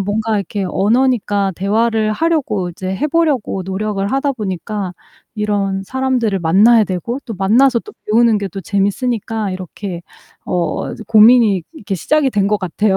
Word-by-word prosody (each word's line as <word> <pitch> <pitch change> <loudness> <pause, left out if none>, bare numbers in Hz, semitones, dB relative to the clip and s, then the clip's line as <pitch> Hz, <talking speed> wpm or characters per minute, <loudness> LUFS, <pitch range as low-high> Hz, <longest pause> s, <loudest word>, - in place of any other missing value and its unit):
뭔가 215 +3 -1
이렇게 200 0 -3
언어니까 205 -2 +1
대화를 215 +3 +1
하려고 255 - 0
이제 185 +2 -7
해보려고 300 - 0
노력을 195 +1 -2
하다 275 +1 0
보니까 200 -3 -4 0.4
이런 200 -2 -1
사람들을 255 -5 0
만나야 210 +7 +5
되고 195 +8 -3
또 225 -4 -6
만나서 235 +6 +3
또 420 - -13
배우는 225 0 +3
게 200 - -3
또 195 +2 -7
재밌으니까 210 +2 -1
이렇게 185 -1 -6 0.4
어 170 -3 -2
이제 - - -10
고민이 220 -4 +5
이렇게 205 -11 -5
시작이 295 - +1
된 200 -3 +1
것 210 0 +1
같아요. 190 +2 0
210 Hz, 345 characters per minute, -17 LUFS, 195-235 Hz, 0.4 s, 만나야